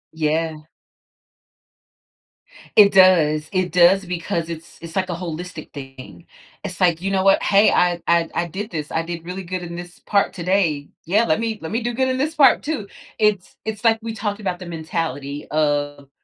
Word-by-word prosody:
Yeah. 155 0 -1 2.1
It 205 -2 +8
does. 160 -5 +4
It 185 -3 0
does 180 +3 +5
because 170 -2 -3
it's 165 0 -9
it's 165 -1 -9
like 185 -1 0
a 175 - -2
holistic 170 -1 -7
thing. 135 +4 -11 0.4
It's 190 -2 -7
like, 175 -2 +3
"You 195 +1 -2
know 190 -1 +1
what? 195 0 +4
Hey. 200 +1 +5
I 175 -1 +2
I 170 -1 +3
I 170 - -1
did 205 +6 -6
this. 150 -3 -5
I 160 - 0
did 170 0 -6
really 185 +2 -5
good 185 0 -4
in 170 -1 -7
this 175 +1 -9
part 200 -1 +1
today. 170 -5 0 0.2
Yeah, 210 +7 +2
let 155 - +1
me 225 -2 -2
let 160 - -6
me 230 +3 -1
do 240 +1 -2
good 260 +2 +1
in 255 - -1
this 295 +4 -1
part 295 -4 +5
too." 290 -10 -3 0.3
It's 210 -4 +1
it's 220 0 -5
like 225 -1 +4
we 225 0 -5
talked 205 -1 -3
about 185 -3 -2
the 185 - -9
mentality 160 -3 -4
of 145 -2 -1
175 Hz, 190 wpm, -21 LUFS, 160-200 Hz, 2.1 s, It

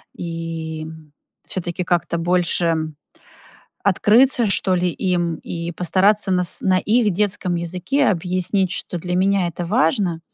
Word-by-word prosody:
и, 165 -2 -5
м, 160 -2 -12 0.3
всё-таки 180 0 -3
как-то 175 -1 0
больше 170 -1 +1 1.1
открыться, 225 +5 +4
что 190 -1 +2
ли, 180 0 +1
им 175 -2 -1
и 170 0 -6
постараться 190 +4 +2
на 180 -1 +2
с 175 - -1
на 185 -1 +2
их 220 +1 +2
детском 195 -2 -1
языке 180 - -1
объяснить, 185 +1 0
что 180 -2 -3
для 180 +1 -3
меня 190 0 +2
это 170 +1 -5
важно. 200 -4 +1
180 Hz, 135 wpm, -20 LUFS, 170-195 Hz, 1.1 s, открыться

